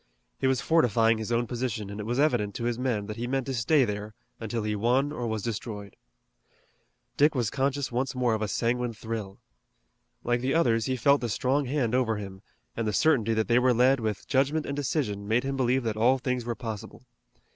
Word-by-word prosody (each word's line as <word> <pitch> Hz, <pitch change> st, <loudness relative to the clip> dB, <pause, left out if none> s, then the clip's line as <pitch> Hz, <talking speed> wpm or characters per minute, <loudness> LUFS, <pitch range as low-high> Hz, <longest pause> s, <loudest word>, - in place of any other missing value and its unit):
He 130 Hz, -, +1 dB
was 130 Hz, -2 st, +1 dB
fortifying 115 Hz, -, +3 dB
his 110 Hz, +1 st, -4 dB
own 120 Hz, +1 st, +1 dB
position, 115 Hz, -4 st, -3 dB
and 100 Hz, -, -7 dB
it 105 Hz, -, -5 dB
was 120 Hz, +2 st, -1 dB
evident 120 Hz, -9 st, +1 dB
to -, -, -4 dB
his 120 Hz, 0 st, -1 dB
men 120 Hz, -6 st, -1 dB
that 105 Hz, 0 st, -6 dB
he 120 Hz, +1 st, -3 dB
meant 135 Hz, 0 st, -1 dB
to 135 Hz, -, -3 dB
stay 130 Hz, +3 st, +3 dB
there 105 Hz, 0 st, -5 dB, 0.2 s
until 115 Hz, 0 st, -3 dB
he 105 Hz, 0 st, -1 dB
won 125 Hz, +7 st, +1 dB
or 125 Hz, -5 st, -3 dB
was 110 Hz, -2 st, -3 dB
destroyed. 105 Hz, -3 st, -5 dB, 1.2 s
Dick 150 Hz, +1 st, +4 dB
was 120 Hz, -5 st, 0 dB
conscious 140 Hz, 0 st, -1 dB
once 130 Hz, +2 st, -1 dB
more 125 Hz, -2 st, +1 dB
of 110 Hz, -, -1 dB
a 110 Hz, -, 0 dB
sanguine 120 Hz, +2 st, -1 dB
thrill. 110 Hz, -3 st, -6 dB, 0.9 s
Like 120 Hz, 0 st, 0 dB
the 130 Hz, +4 st, 0 dB
others, 115 Hz, -9 st, +2 dB
he 130 Hz, -, 0 dB
felt 140 Hz, +3 st, +3 dB
the 120 Hz, -, -2 dB
strong 135 Hz, +6 st, 0 dB
hand 125 Hz, -3 st, -1 dB
over 120 Hz, -4 st, +1 dB
him, 95 Hz, -2 st, -8 dB, 0.3 s
and 115 Hz, -1 st, -2 dB
the 105 Hz, -, -1 dB
certainty 115 Hz, -6 st, +3 dB
that 110 Hz, 0 st, 0 dB
they 120 Hz, +1 st, +4 dB
were 125 Hz, -1 st, +3 dB
led 130 Hz, +3 st, +4 dB
with 110 Hz, -3 st, -3 dB
judgment 140 Hz, +3 st, +1 dB
and 140 Hz, -, -3 dB
decision 125 Hz, -8 st, -2 dB
made 115 Hz, +4 st, +2 dB
him 135 Hz, 0 st, -2 dB
believe 130 Hz, 0 st, +1 dB
that 110 Hz, -2 st, -2 dB
all 125 Hz, +4 st, +4 dB
things 125 Hz, -2 st, -2 dB
were 120 Hz, -1 st, -2 dB
possible. 110 Hz, -4 st, -7 dB
120 Hz, 215 wpm, -27 LUFS, 110-130 Hz, 1.2 s, Dick